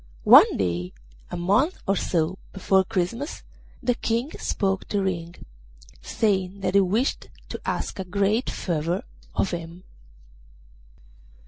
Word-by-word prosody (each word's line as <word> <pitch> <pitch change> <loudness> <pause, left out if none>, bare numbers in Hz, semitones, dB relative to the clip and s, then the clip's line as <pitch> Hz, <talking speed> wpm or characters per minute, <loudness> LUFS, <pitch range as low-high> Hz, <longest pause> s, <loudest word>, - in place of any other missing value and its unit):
One - - +8
day, 90 -1 -2 0.4
a - - -5
month 205 - +2
or 195 - +2
so 175 0 0
before 190 0 +3
Christmas, 225 - -3 0.4
the 245 - +2
King 235 +4 -1
spoke 195 -1 -1
to 205 - 0
Ring, 170 -3 -3 0.7
saying 195 -2 0
that 185 - -1
he 200 - +6
wished 210 +8 0 0.2
to - - -6
ask - - -3
a - - -1
great 200 +6 0
favour 170 +1 -2 0.3
of 195 - +1
him. 170 +1 -6
190 Hz, 125 wpm, -25 LUFS, 175-205 Hz, 0.7 s, One